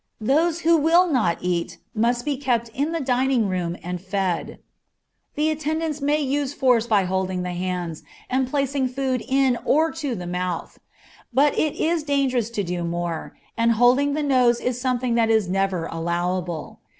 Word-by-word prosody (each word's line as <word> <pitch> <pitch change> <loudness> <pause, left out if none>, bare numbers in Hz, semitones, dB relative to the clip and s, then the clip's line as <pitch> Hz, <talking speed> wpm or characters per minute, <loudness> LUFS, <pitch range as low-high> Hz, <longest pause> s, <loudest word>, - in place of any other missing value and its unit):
Those 315 +9 +1
who 335 0 +4
will 330 +4 +4
not 235 - +1
eat 175 -1 -2 0.2
must 240 +2 0
be 295 -2 0
kept 245 -4 -1
in 280 +7 -2
the 335 - -1
dining 255 -4 +1
room 180 -2 -2
and 180 0 -4
fed; 190 -2 -2 0.8
the 305 +1 +1
attendants 310 0 -2
may 290 +2 +2
use 285 0 -1
force 245 -3 +3
by 210 -4 +3
holding 185 0 -1
the 180 - -3
hands, 175 -2 -3 0.3
and 260 0 0
placing 275 -1 0
food 255 -1 -2
in 265 -2 +2
or 315 +2 +3
to 290 -6 -3
the 180 -3 -6
mouth; 180 0 -4 0.5
but 280 +4 +3
it 305 - 0
is 335 0 0
dangerous 270 -6 0
to 215 -3 -2
do 175 -1 -3
more, 170 -1 -4 0.2
and 230 0 +3
holding 255 +5 +3
the 305 - -1
nose 250 -4 +3
is 250 0 -2
something 250 -1 0
that 230 -1 +2
is 220 -4 +3
never 190 -2 0
allowable. 170 0 -3
245 Hz, 170 wpm, -23 LUFS, 185-280 Hz, 0.8 s, who